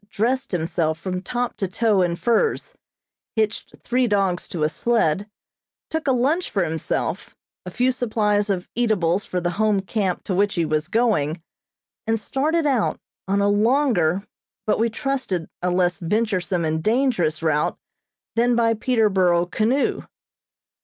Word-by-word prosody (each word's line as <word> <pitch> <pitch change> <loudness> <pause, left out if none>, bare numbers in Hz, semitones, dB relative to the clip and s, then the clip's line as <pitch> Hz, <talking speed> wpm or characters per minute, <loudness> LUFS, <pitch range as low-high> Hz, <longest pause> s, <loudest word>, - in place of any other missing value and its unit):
dressed 245 +6 -1
himself 165 -2 -1
from 180 +1 -3
top 245 +4 -3
to 200 -3 -2
toe 210 +1 +2
in 175 -1 +1
furs, 335 - 0 0.6
hitched 215 -2 -1
three 250 +1 +1
dogs 195 -4 0
to 165 -4 -3
a - - +4
sled, 205 0 0 0.6
took 320 -2 -2
a - - +4
lunch 275 +8 +1
for 195 - 0
himself, 160 -2 -3 0.3
a - - -2
few 250 +7 +1
supplies 215 -4 0
of 185 -3 -1
eatables 205 -6 +1
for 180 - -2
the 175 0 -1
Home 215 -2 +3
camp 190 -1 -2
to 190 - -3
which 200 +2 +1
he 170 -2 +1
was 155 0 -1
going, 195 -10 +1 0.7
and 225 0 +1
started 305 +8 0
out, 265 -6 +1 0.3
on 200 +1 +1
a 200 - +3
longer, 205 - +2 0.4
but 215 - +1
we 230 +1 +2
trusted 255 - -2
a 180 - 0
less 180 0 +1
venturesome 185 -2 0
and 160 0 -1
dangerous 215 - +1
route 150 -2 +1 0.6
than 240 +1 +3
by 230 -1 +3
Peterborough 195 -7 +2
canoe. 225 +9 0
205 Hz, 150 wpm, -22 LUFS, 175-235 Hz, 0.7 s, a